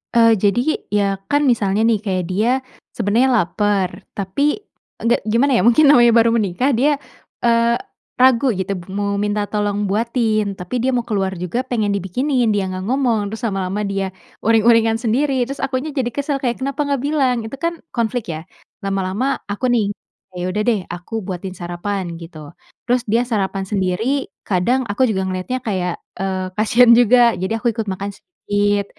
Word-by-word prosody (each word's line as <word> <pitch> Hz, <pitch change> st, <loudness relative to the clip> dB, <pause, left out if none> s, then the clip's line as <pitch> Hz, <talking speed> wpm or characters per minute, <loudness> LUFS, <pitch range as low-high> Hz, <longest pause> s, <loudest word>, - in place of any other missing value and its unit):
Eee, 230 Hz, -1 st, +6 dB
jadi, 205 Hz, +4 st, +2 dB, 0.3 s
ya 200 Hz, -2 st, 0 dB
kan 290 Hz, 0 st, +2 dB
misalnya 220 Hz, -5 st, +2 dB
nih, 225 Hz, -2 st, +3 dB
kayak 190 Hz, -4 st, -2 dB
dia 215 Hz, +6 st, +1 dB, 0.5 s
sebenarnya 230 Hz, +3 st, +2 dB, 0.2 s
lapar, 195 Hz, 0 st, -1 dB
tapi 210 Hz, +10 st, 0 dB, 0.5 s
enggak, 235 Hz, +1 st, +3 dB
gimana 240 Hz, +6 st, +2 dB
ya, -, -, +3 dB
mungkin 275 Hz, +6 st, +5 dB
namanya 240 Hz, -4 st, +6 dB
baru 230 Hz, 0 st, +5 dB
menikah 230 Hz, +4 st, +1 dB
dia, 280 Hz, +5 st, +3 dB, 0.5 s
eee, 235 Hz, 0 st, +3 dB, 0.4 s
ragu 255 Hz, 0 st, +4 dB
gitu 195 Hz, -2 st, -1 dB
b 180 Hz, -2 st, -6 dB
mau 200 Hz, +1 st, -2 dB
minta 205 Hz, 0 st, 0 dB
tolong 205 Hz, 0 st, -1 dB
buatin, 215 Hz, -1 st, 0 dB
tapi 205 Hz, +7 st, -3 dB
dia 260 Hz, -, +1 dB
mau 240 Hz, -, -1 dB
keluar 190 Hz, -4 st, -1 dB
juga 180 Hz, +8 st, -2 dB
pengen 230 Hz, -5 st, -1 dB
dibikinin. 240 Hz, -, 0 dB
Dia 195 Hz, -2 st, 0 dB
enggak 185 Hz, +2 st, -5 dB
ngomong, 235 Hz, -6 st, +1 dB
terus 225 Hz, +3 st, -7 dB
lama-lama 195 Hz, 0 st, -2 dB
dia 195 Hz, -1 st, -2 dB, 0.3 s
uring-uringan 225 Hz, 0 st, +4 dB
sendiri 250 Hz, +3 st, +1 dB
terus 275 Hz, +2 st, -6 dB
akunya 275 Hz, +2 st, -2 dB
jadi 255 Hz, -4 st, -1 dB
kesel 280 Hz, +2 st, -2 dB
kayak, 240 Hz, -2 st, -1 dB
"Kenapa 275 Hz, +1 st, -2 dB
enggak 285 Hz, -1 st, 0 dB
bilang?" 270 Hz, -5 st, +1 dB
Itu 225 Hz, -, -8 dB
kan 335 Hz, 0 st, -1 dB, 0.2 s
konflik 230 Hz, -6 st, -2 dB
ya. 155 Hz, -, -6 dB, 0.4 s
Lama-lama 195 Hz, +6 st, -1 dB
aku 205 Hz, +5 st, -2 dB
nih, 215 Hz, -4 st, +1 dB, 0.4 s
"Ya 180 Hz, +1 st, -3 dB
udah 210 Hz, +3 st, -1 dB
deh, 225 Hz, -4 st, +2 dB
aku 175 Hz, +6 st, -5 dB
buatin 185 Hz, 0 st, -5 dB
sarapan." 175 Hz, 0 st, -4 dB
Gitu. 165 Hz, -2 st, -10 dB, 0.5 s
Terus 245 Hz, 0 st, +2 dB
dia 230 Hz, +3 st, +2 dB
sarapan 195 Hz, -5 st, -2 dB
sendiri 210 Hz, +8 st, -1 dB
kadang 210 Hz, +8 st, +1 dB
aku 255 Hz, +6 st, +2 dB
juga 200 Hz, -5 st, 0 dB
ngeliatnya 185 Hz, +8 st, -3 dB
kayak, 185 Hz, -6 st, -2 dB, 0.2 s
eee, 190 Hz, -1 st, -2 dB
kasihan 230 Hz, +3 st, +5 dB
juga, 240 Hz, -3 st, +5 dB
jadi 215 Hz, +5 st, -2 dB
aku 240 Hz, -, +2 dB
ikut 225 Hz, -1 st, -3 dB
makan 195 Hz, 0 st, -4 dB
sedikit 205 Hz, -, -1 dB
220 Hz, 170 wpm, -19 LUFS, 195-245 Hz, 0.5 s, Eee